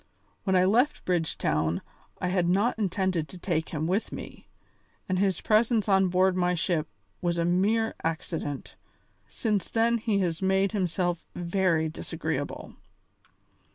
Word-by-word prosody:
When 190 -2 +2
I 185 0 +5
left 240 +9 +2
Bridgetown 85 - 0 0.4
I 180 - -1
had 180 -2 +1
not 205 +6 +2
intended 185 -5 0
to 185 - -10
take 170 -3 -1
him 155 -1 -2
with 190 +6 0
me, - - -9 0.6
and 185 -1 0
his 190 -3 +1
presence 220 0 +3
on 190 -1 +4
board 185 +1 +3
my 180 -1 +2
ship 165 -2 0 0.3
was 175 -1 0
a 170 - +1
mere 205 +6 +2
accident. 160 -3 -4 0.5
Since 210 -4 -1
then 235 +1 +2
he 215 -2 0
has 170 -2 -1
made 190 +1 +2
himself 175 -3 -1
very 175 -2 +1
disagreeable." 120 - -4
185 Hz, 140 wpm, -27 LUFS, 170-200 Hz, 0.6 s, I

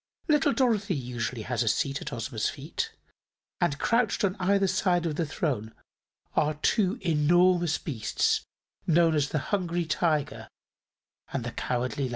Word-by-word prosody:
Little 295 -2 +4
Dorothy 220 -8 +1
usually 120 -3 -3
has 125 -1 -1
a 115 - 0
seat 135 +6 0
at - - -5
Ozma's 115 -1 -2
feet, - - -4 0.7
and 140 - +1
crouched 230 - +1
on 190 -1 +1
either 195 +2 +3
side 180 -2 +1
the 165 0 -1
throne 125 -8 -2 0.6
are 150 +1 +2
two 195 +7 +1
enormous 175 +1 +3
beasts 125 -9 0 0.5
known 165 0 +4
as 145 -2 +1
the - - -1 0.2
Hungry 175 -3 0
Tiger 155 -1 0 0.8
and - - -2
the - - -4
Cowardly 125 +3 -2
Lion. - - -3
160 Hz, 145 wpm, -28 LUFS, 135-185 Hz, 0.8 s, Little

